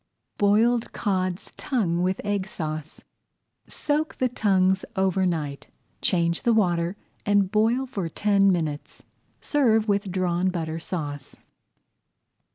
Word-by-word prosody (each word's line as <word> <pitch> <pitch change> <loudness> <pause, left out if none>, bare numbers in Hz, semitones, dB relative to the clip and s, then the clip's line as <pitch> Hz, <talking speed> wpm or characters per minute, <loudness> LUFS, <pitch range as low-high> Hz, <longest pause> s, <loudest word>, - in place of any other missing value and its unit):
BOILED 225 +4 +3
CODS' 185 -3 -2
TONGUES 185 - 0
WITH 185 +1 0
EGG 205 -1 -1
SAUCE 155 -6 -6 0.6
Soak 305 +1 -2
the 255 - +1
tongues 190 -5 +2
over 190 -1 +2
night, 150 -5 -3 0.3
change 170 -1 +1
the 235 -1 +3
water, 175 -3 +1 0.3
and 200 -2 +2
boil 225 +5 +2
for 200 -10 -4
ten 200 +2 +3
minutes. 155 -5 -3 0.4
Serve 230 -7 +2
with 200 -2 0
Drawn 180 0 +1
Butter 165 -3 -3
Sauce. 145 -5 -5
190 Hz, 115 wpm, -25 LUFS, 170-210 Hz, 0.6 s, BOILED